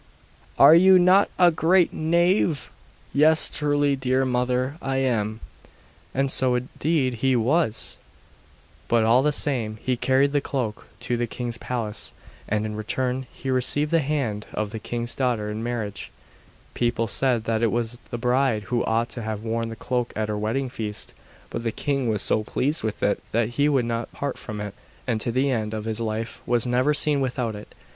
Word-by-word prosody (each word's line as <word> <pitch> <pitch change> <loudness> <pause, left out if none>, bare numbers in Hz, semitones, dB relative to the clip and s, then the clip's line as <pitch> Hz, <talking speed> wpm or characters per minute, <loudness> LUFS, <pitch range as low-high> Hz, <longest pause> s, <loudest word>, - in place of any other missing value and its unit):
'Are 140 +3 +9
you 185 +3 +7
not 185 +3 +5
a 180 -1 +6
great 170 +2 +3
knave?' 170 -1 +1 0.4
'Yes, 155 +2 +4
truly 145 -1 +1
dear 130 0 +1
mother, 125 +2 0
I 135 -1 -2
am.' 110 -4 0 0.7
And 135 0 0
so 130 -2 +3
indeed 130 +2 0
he 130 -1 +3
was! 125 +1 0 0.9
But, 115 -1 +3
all 115 +3 +5
the 150 +2 +2
same, 120 -7 -1
he 130 +2 -1
carried 135 +3 +2
the 145 -1 +1
cloak 125 -7 -3
to 120 - -1
the 120 0 -1
king's 120 0 -5
palace, 115 -5 -4 0.4
and 105 0 0
in 105 -1 -4
return 125 +4 -2
he 135 - -5
received 130 +4 +1
the 165 - +4
hand 135 -8 -2
of 105 -1 -2
the 110 - -5
king's 120 +2 -4
daughter 120 -5 -1
in 110 +1 -4
marriage. 115 -4 -4 0.6
People 120 -1 0
said 120 0 +1
that 115 0 -1
it 115 -2 +2
was 120 0 -2
the 120 - -4
bride 125 -2 +1
who 120 - +2
ought 115 +2 0
to 120 - -6
have 110 -1 -4
worn 115 0 -2
the 115 - -6
cloak 125 +1 -2
at 110 0 -2
her 105 - -1
wedding 115 +6 -1
feast; 105 -3 -5 0.4
but 115 - -3
the 115 -1 -1
king 135 0 -1
was 105 -2 0
so 110 - +1
pleased 145 +8 -1
with 110 -2 -4
it 100 - +1
that 115 0 +1
he 145 +5 +1
would 135 -5 +2
not 115 0 -3
part 140 -2 -4
from 105 -1 -6
it; 105 -1 -5 0.3
and 115 -4 -1
to 120 - -1
the 135 +3 +1
end 110 -3 -2
of 110 0 -5
his 110 0 -2
life 110 0 -3
was 120 -2 +2
never 125 +4 +2
seen 145 -1 +2
without 125 -3 -1
it. 105 - -11
125 Hz, 185 wpm, -24 LUFS, 110-140 Hz, 0.9 s, Are